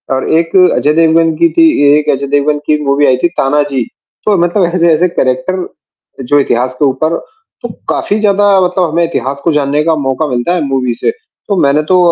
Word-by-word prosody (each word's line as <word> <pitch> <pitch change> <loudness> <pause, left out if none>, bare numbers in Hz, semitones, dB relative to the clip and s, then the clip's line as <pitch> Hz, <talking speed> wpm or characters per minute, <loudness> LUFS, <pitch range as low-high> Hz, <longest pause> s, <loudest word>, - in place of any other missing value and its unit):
और 130 - -3
एक 165 +2 -2 0.2
अजय 150 +1 +1
देवगन 165 0 +2
की 170 0 +3
थी 330 -1 +6 0.3
एक 150 0 -2
अजय 140 0 -5
देवगन 145 +1 0
की 150 -1 +2
मूवी 140 +1 +2
आई 125 - +3
थी 175 - +1
तानाजी, 140 -2 0 0.4
तो 205 -3 +2
मतलब 175 +2 +1
ऐसे-ऐसे 170 0 +2
करैक्टर 150 +7 -2 0.6
जो 145 +3 +2
इतिहास 125 -1 -1
के 145 - +2
ऊपर 150 +5 0 0.5
तो - - -5 0.2
काफ़ी 210 +2 -1
ज़्यादा 205 -1 +2
मतलब 180 -1 0
हमें 170 +2 0
इतिहास 140 -4 -3
को 170 - +1
जानने 145 +1 0
का 165 -1 +1
मौका 140 +1 -2
मिलता 125 +7 -1
है 175 - -1
मूवी 130 -3 -1
से, - - -1
तो 445 - -7
मैंने 145 +2 +2
तो 185 - +5
155 Hz, 195 wpm, -11 LUFS, 140-175 Hz, 0.6 s, थी